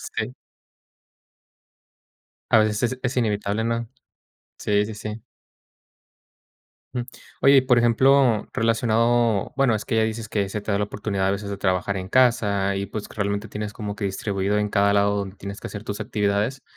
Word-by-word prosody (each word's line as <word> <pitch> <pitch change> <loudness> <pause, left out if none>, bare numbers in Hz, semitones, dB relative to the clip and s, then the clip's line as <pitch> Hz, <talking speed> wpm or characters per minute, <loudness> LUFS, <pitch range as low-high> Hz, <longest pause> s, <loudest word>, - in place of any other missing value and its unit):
Sí. - - -4 2.2
A - - +6
veces 110 +3 +1
es - - -17
es 125 0 -2
inevitable, 105 -2 0
¿no? 115 0 -1 0.7
Sí, 105 0 +1
sí, 110 - -6
sí. 105 +1 -6 1.7
Mm, 125 - -1 0.4
oye 140 0 +7
y - - +8
por 130 -2 +3
ejemplo, 120 0 +4
relacionado 115 -1 +2
bueno, 135 -5 +3
es 105 - -3
que 115 - -1
ya 110 - +4
dices 110 0 -4
que 100 -3 -1
se 105 +2 -4
te 105 - -5
da 100 - +1
la 105 - +1
oportunidad 100 -2 -2
a 95 - +2
veces 100 0 -4
de 100 - -3
trabajar 95 +1 0
en 95 0 -5
casa 105 -6 +2
y 100 0 -2
pues 105 +1 -6
realmente 100 +1 -2
tienes 105 +1 -5
como 105 -2 -5
que 105 - -4
distribuido 100 +1 -1
en 105 0 0
cada 100 0 +3
lado 100 0 +2
donde 100 -1 -4
tienes 100 +1 -7
que - - -6
hacer 105 - -7
tus 105 0 -5
actividades, 105 +3 -1
105 Hz, 175 wpm, -23 LUFS, 100-115 Hz, 2.2 s, y